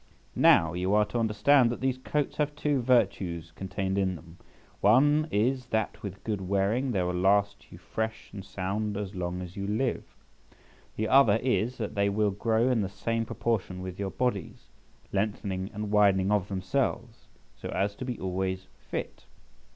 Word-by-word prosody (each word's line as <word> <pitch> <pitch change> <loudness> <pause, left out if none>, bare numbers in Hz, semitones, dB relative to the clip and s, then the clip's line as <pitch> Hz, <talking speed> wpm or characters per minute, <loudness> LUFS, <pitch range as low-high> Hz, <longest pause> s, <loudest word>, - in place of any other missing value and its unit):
Now, 80 0 +5
you 90 +3 0
are 105 0 +4
to 120 +3 -3
understand 115 +4 +4
that 120 - -3
these 130 0 -1
coats 145 +2 -2
have 150 -1 0
two 145 -2 0
virtues 95 -9 +1
contained 95 +2 -3
in 95 -2 0
them; 85 +1 -14 0.4
one 145 +8 +4
is, 125 +4 0
that 110 -3 -2
with 100 -1 -7
good 105 -3 -2
wearing 100 +7 0
they 95 -5 +1
will 90 0 -1
last 100 +2 +1
you - - -10
fresh 110 0 -4
and 100 -2 -7
sound 100 +2 -3
as 100 -1 -4
long 90 -1 -3
as 90 0 -9
you 100 0 -4
live; 110 +5 -1 0.9
the 110 - -1
other 130 -5 +6
is, 125 -1 0
that 110 -3 -4
they 100 0 +2
will 105 0 +1
grow 110 +4 +1
in 125 -4 +2
the 95 - -2
same 115 +4 -2
proportion 95 -7 -2
with 95 0 -7
your 100 -1 -2
bodies, 100 - -3 0.4
lengthening 100 -2 -2
and 105 -1 -5
widening 100 -2 +4
of 100 -2 +1
themselves, 115 +4 -2 0.3
so - - -7
as 100 +1 0
to 115 - -7
be 125 -3 -4
always 95 0 -2 0.2
fit. - - -5
105 Hz, 175 wpm, -28 LUFS, 95-115 Hz, 0.9 s, other